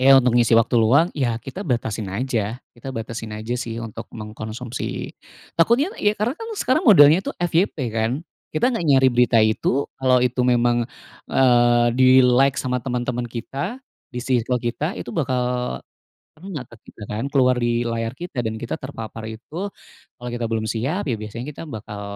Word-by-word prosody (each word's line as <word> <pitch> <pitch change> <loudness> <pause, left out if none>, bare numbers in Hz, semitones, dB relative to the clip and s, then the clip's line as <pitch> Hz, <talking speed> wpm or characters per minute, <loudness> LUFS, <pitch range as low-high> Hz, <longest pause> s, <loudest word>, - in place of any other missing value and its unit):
Iya, 135 +1 +8
untuk 125 -2 +2
ngisi 115 -1 +5
waktu 115 +2 +1
luang, 140 +9 +5
ya 120 -6 0
kita 135 - -7
batasin 110 - -2
aja. 115 0 -2 0.2
Kita 120 +3 -8
batasin 115 -2 -6
aja 110 +3 -4
sih 115 -2 -4
untuk 115 0 -7
mengkonsumsi 110 +2 -6 0.4
takutnya 240 - +3
ya, 210 +1 0
karena 235 +6 0
kan 450 +5 -8
sekarang 260 - +2
modelnya 170 - +7
itu - - -3
FYP 175 +2 +1 0.2
kan, 110 0 +1 0.4
kita 240 +11 +1
gak 200 - -2
nyari 135 -4 +4
berita 120 -1 +4
itu, 110 +5 +2
kalau 130 -1 +3
itu 125 0 +1
memang, 120 -1 +3 0.5
eee, 120 -2 +4
di-like 130 +1 +5
sama 125 -1 -1
teman-teman 125 -1 -2
kita 135 - -4 0.3
di 125 - -5
circle 125 -1 0
kita 125 +9 -3
itu - - -6
bakal, 125 - -1 0.6
kena 160 -3 -7
ke 115 - -15
kita 105 - -12
kan, 105 +4 -4
keluar 130 -2 +4
di 120 0 +1
layar 115 0 -2
kita 170 -8 -4
dan 110 -1 -3
kita 120 +7 -5
terpapar 115 -4 -7
itu, 155 - -6 0.5
kalau 120 0 -6
kita 120 -1 -2
belum 110 -1 -1
siap, 130 - -2
ya 130 -6 0
biasanya 115 +4 -6
kita - - -9
bakal, 110 -4 -7
125 Hz, 170 wpm, -22 LUFS, 115-135 Hz, 0.6 s, Iya